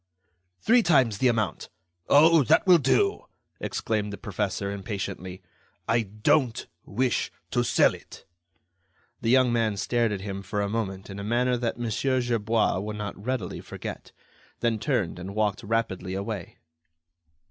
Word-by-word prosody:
"Three 240 +2 +5
times 130 - +3
the 130 - +4
amount." 110 -6 -1 0.4
"Oh! 160 +2 +7
that - - +4
will 180 -2 +7
do," 395 - +1 0.3
exclaimed 105 -2 -2
the 100 - -6
professor, 100 -1 -3
impatiently; 95 -2 -5 0.4
"I 115 0 +3
don't 110 +4 +1 0.2
wish 125 -1 0 0.2
to - - +2
sell - - +4
it." - - -13 1.0
The 115 - -1
young 130 -1 +4
man 110 -3 +1
stared 120 +2 +1
at 100 -2 -3
him 100 -1 -5
for 100 +1 -4
a 100 - -1
moment 95 -3 -3
in 95 - -7
a - - -5
manner 125 +4 +1
that 120 -2 -2
Mon. 120 -2 -3
Gerbois 115 -4 +1
would 105 +2 -4
not 105 -1 -4
readily 125 -6 -3
forget, - - -8 0.5
then 115 -2 +1
turned 110 - -1
and 95 +3 -7
walked 105 -2 0
rapidly 100 -4 -2
away. 100 -2 -5
110 Hz, 145 wpm, -26 LUFS, 100-120 Hz, 1.0 s, Oh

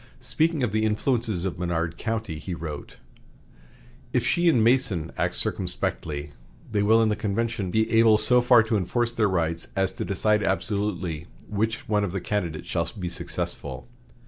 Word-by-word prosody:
Speaking 160 -3 0
of 115 - 0
the 110 +1 +1
influences 110 -3 0
of 90 -2 -3
Menard 85 -2 -1
County, 110 -8 -3
he 90 +2 -5
wrote: 75 -3 -7 1.2
"If 125 -2 +1
she 175 +4 +3
and 120 -8 +4
Mason 110 - +2
act - - -1
circumspectly, 75 -1 -1 0.4
they 105 -1 +1
will 110 +2 +5
in 110 - +2
the 105 - +1
convention 110 0 -2
be 110 +4 +2
able 115 -1 +6
so 125 +3 +5
far 120 -2 +6
to 110 0 0
enforce 115 +6 0
their 110 -3 +1
rights 85 -2 -1
as 95 -1 +1
to 115 - -5
decide 105 +1 +1
absolutely 95 -5 -2 0.2
which 110 +2 -2
one 105 -1 +2
of 95 -3 -3
the 95 - -1
candidates 85 -5 -3
shall 85 -1 -1
be 90 -3 -3
successful. 85 - -5
105 Hz, 170 wpm, -25 LUFS, 90-115 Hz, 1.2 s, able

